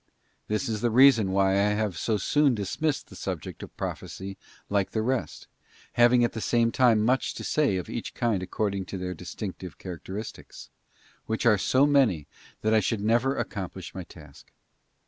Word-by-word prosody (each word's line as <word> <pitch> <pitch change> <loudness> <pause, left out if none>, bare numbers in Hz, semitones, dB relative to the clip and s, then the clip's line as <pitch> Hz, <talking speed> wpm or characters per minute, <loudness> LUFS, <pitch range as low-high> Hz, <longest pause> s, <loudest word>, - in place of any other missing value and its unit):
This 105 +5 -1
isthe 115 +1 0
reason 115 -5 +6
why 95 0 +3
I 100 +2 +3
have 105 -4 -1
so 110 +6 0
soon 140 +6 +2
dismissed 135 +9 -1
the - - -12
subject - - -5
of - - -10
Prophecy 95 +1 -5 0.3
like 100 -2 0
the 110 - 0
rest, 120 - -2 0.5
having 120 0 +5
at 120 - +2
the 110 - -4
same 115 0 +2
time 115 -4 +4
much 130 +3 +1
to - - -6
say 145 -11 +1
of 90 - -4
each - - -5
kind 115 -6 0
according 100 +1 -2
to 95 - -6
their 90 0 -4
distinctive 90 +1 -7
characteristics, 95 +4 -8 0.6
which 110 +1 -2
are 105 -4 +5
so 130 +7 +3
many 130 - +3 0.4
that 110 +1 +1
I 110 - +6
should 105 +1 -1
never 120 +5 +2
accomplish 95 -3 -5
my 95 - -6
task. 75 -5 -15
105 Hz, 170 wpm, -27 LUFS, 95-120 Hz, 0.6 s, reason